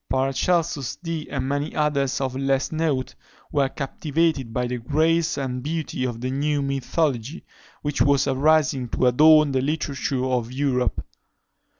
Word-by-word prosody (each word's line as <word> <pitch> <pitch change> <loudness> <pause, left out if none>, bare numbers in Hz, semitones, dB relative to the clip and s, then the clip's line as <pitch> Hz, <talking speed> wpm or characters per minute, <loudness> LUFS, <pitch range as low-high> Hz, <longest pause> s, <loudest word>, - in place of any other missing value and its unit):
Paracelsus, 135 +2 0
Dee, 165 -3 -5
and 130 -2 -3
many 145 +2 -2
others 140 -3 0
of 130 -2 -2
less 135 0 0
note, 155 -5 -1 0.4
were 140 -2 +2
captivated 145 -1 -1
by 125 +2 -1
the 125 0 -3
grace 160 +6 +1
and 130 -2 -3
beauty 150 -3 -3
of 120 -2 -4
the 130 +1 -2
new 145 +2 0
mythology, 140 +1 -2 0.4
which 145 -1 -1
was 140 -1 +3
arising 135 -2 +2
to 130 - 0
adorn 150 +4 +6
the 130 -1 +1
literature 140 -2 -2
of 125 -2 -1
Europe. 130 -2 -1
140 Hz, 140 wpm, -23 LUFS, 130-155 Hz, 0.4 s, adorn